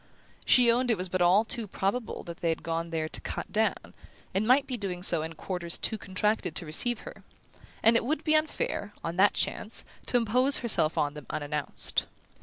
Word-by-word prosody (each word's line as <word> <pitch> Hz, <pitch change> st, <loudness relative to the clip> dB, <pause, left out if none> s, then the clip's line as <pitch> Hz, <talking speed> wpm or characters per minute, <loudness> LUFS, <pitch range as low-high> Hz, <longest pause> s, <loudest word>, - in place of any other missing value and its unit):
She 245 Hz, -2 st, +6 dB
owned 245 Hz, +1 st, +1 dB
it 225 Hz, -, +2 dB
was 180 Hz, 0 st, -3 dB
but 185 Hz, 0 st, -1 dB, 0.3 s
too 230 Hz, -4 st, -3 dB
probable 200 Hz, +5 st, -3 dB
that 170 Hz, -1 st, -8 dB
they 170 Hz, -, -1 dB
had 160 Hz, -, -2 dB
gone 165 Hz, +1 st, -3 dB
there 160 Hz, -1 st, -2 dB
to -, -, -2 dB
"cut -, -, -5 dB
down", 220 Hz, 0 st, -1 dB, 0.4 s
and 200 Hz, +3 st, 0 dB
might 265 Hz, +3 st, +5 dB
be 255 Hz, -, -3 dB
doing 185 Hz, -5 st, -4 dB
so 170 Hz, -3 st, +4 dB
in 160 Hz, +1 st, -6 dB
quarters 175 Hz, 0 st, -3 dB
too -, -, -1 dB
contracted 200 Hz, -3 st, -1 dB
to 175 Hz, -, -1 dB
receive 220 Hz, +10 st, +1 dB
her; -, -, -11 dB, 0.6 s
and 225 Hz, +1 st, +5 dB
it 230 Hz, -, +3 dB
would 305 Hz, +5 st, -1 dB
be 310 Hz, -, +2 dB
unfair, 310 Hz, -, -1 dB
on 165 Hz, +1 st, -4 dB
that 200 Hz, +2 st, +5 dB
chance, 220 Hz, -, -1 dB, 0.2 s
to 245 Hz, -, +2 dB
impose 250 Hz, +4 st, +4 dB
herself 210 Hz, -10 st, 0 dB
on 145 Hz, -1 st, 0 dB
them 150 Hz, -2 st, -11 dB
unannounced. 150 Hz, 0 st, -2 dB
200 Hz, 200 wpm, -28 LUFS, 165-240 Hz, 0.6 s, She